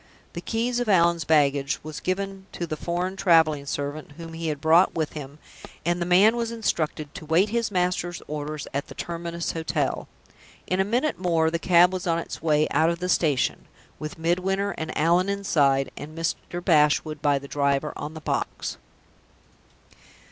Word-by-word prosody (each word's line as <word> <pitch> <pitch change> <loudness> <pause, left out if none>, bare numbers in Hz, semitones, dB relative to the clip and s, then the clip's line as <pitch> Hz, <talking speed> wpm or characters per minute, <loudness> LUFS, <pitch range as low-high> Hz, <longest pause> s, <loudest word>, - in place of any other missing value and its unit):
The 170 - -5
keys 235 +4 -1
of 245 -3 -1
Allan's 170 -4 +3
baggage 140 -3 +2
was 155 0 -6
given 195 +1 -3
to 175 - -3
the 155 - -4
foreign 175 +4 -2
traveling 160 -6 +3
servant 145 +2 -4
whom 165 +1 -9
he 165 0 -4
had 150 -2 -2
brought 165 +5 +4
with 160 -2 -2
him, 145 -1 -8 0.5
and 175 +1 0
the 175 - -1
man 195 +6 +5
was 235 -1 -2
instructed 155 -9 -2
to 195 - -8
wait 175 +6 +3
his 230 0 0
master's 180 -2 -1
orders 150 0 -5
at 140 +1 -2
the - - -11
terminus 170 0 -4
hotel. 160 -3 -2 0.6
In 185 - -1
a - - +4
minute 245 +8 0
more 165 -3 +2
the 170 - -1
cab 175 +1 +5
was 185 -1 -3
on 165 -1 +2
its 170 - -6
way 155 -1 +2
out 160 - +3
of 170 - -1
the 180 +1 -3
station 150 -8 +1 0.3
with 155 0 -6
Midwinter 185 +4 0
and 160 -3 -5
Allan 175 +5 +3
inside, 140 -10 +2
and 155 +2 -9
Mr. 175 +1 -3
Bashwood 150 -2 +3
by 145 -1 +3
the 140 +1 -7
driver 140 +1 0
on 155 +2 -6
the 160 - -8
box. - - -3
165 Hz, 175 wpm, -25 LUFS, 150-185 Hz, 0.6 s, man